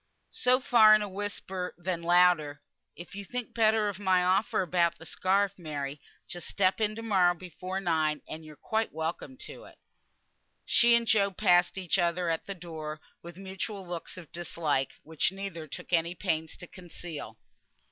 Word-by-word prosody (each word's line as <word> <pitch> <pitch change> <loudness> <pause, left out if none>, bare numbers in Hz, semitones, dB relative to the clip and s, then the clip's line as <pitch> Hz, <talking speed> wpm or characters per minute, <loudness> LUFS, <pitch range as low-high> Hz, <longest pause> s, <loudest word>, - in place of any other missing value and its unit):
So 250 +1 +3
far 225 -5 +7
in 215 - +1
a - - -3
whisper, 190 -2 -5
then 175 -1 -3
louder, 170 -4 +3 0.3
"If 175 +2 -11
you 200 +1 -6
think 245 +3 -5
better 220 -1 +3
of 200 -2 -4
my 185 -2 +3
offer 185 +2 +2
about 170 -1 +1
the 165 - -12
scarf, 195 +3 +1
Mary, 145 -3 -5 0.3
just 175 -2 -7
step 185 +1 +1
in 215 0 +1
to 225 - -7
morrow 185 -5 +3
before 185 +2 -6
nine, 160 -4 0
and 160 +1 -7
you're 155 -1 -12
quite 220 +8 -1
welcome 160 - -4
to - - -10
it." - - -16 0.9
She 235 0 +5
and 235 0 +2
Job 200 -4 +2
passed 175 +1 +4
each 190 0 0
other 175 0 +1
at 165 - -3
the 200 - -4
door, 160 -3 -7 0.2
with 170 0 -11
mutual 190 0 -6
looks 175 0 -6
of 170 -5 -11
dislike, 155 -5 -2
which 160 +1 +1
neither 190 -5 -6
took 150 - -8
any 170 +1 +2
pains 160 -4 -2
to - - -9
conceal. 170 - -9
180 Hz, 175 wpm, -29 LUFS, 165-200 Hz, 0.9 s, far